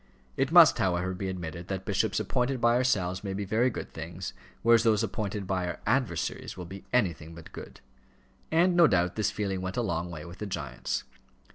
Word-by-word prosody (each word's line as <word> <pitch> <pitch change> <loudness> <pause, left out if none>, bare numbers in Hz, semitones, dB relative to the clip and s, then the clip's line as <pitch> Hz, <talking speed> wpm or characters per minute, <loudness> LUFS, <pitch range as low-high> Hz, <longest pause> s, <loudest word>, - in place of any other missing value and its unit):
It - - 0
must, - - +8
however, 95 0 +1
be 95 +1 -4
admitted 85 -1 -6
that 95 -1 -4
bishops - - +1
appointed 125 +1 0
by 120 0 +4
ourselves 95 -8 +1
may 95 -2 -3
be 100 0 -3
very 115 +6 +2
good - - -6
things, 80 +2 -6 0.3
whereas 115 0 +6
those 110 -3 +3
appointed 105 -1 -3
by 90 -1 -1
our 85 -3 -4
adversaries 115 - -1
will 90 - -6
be 95 +3 -9
anything 85 -9 0
but 85 - -12
good. - - -10 0.7
And, 175 +3 +4
no 170 -2 +7
doubt, 90 -5 +1
this 110 - +1
feeling 95 -3 -2
went 95 +3 -4
a 120 - +1
long 90 -5 -2
way 80 -3 -7
with 85 +1 -11
the 105 - -4
giants. 70 -9 -3
95 Hz, 200 wpm, -28 LUFS, 90-115 Hz, 0.7 s, must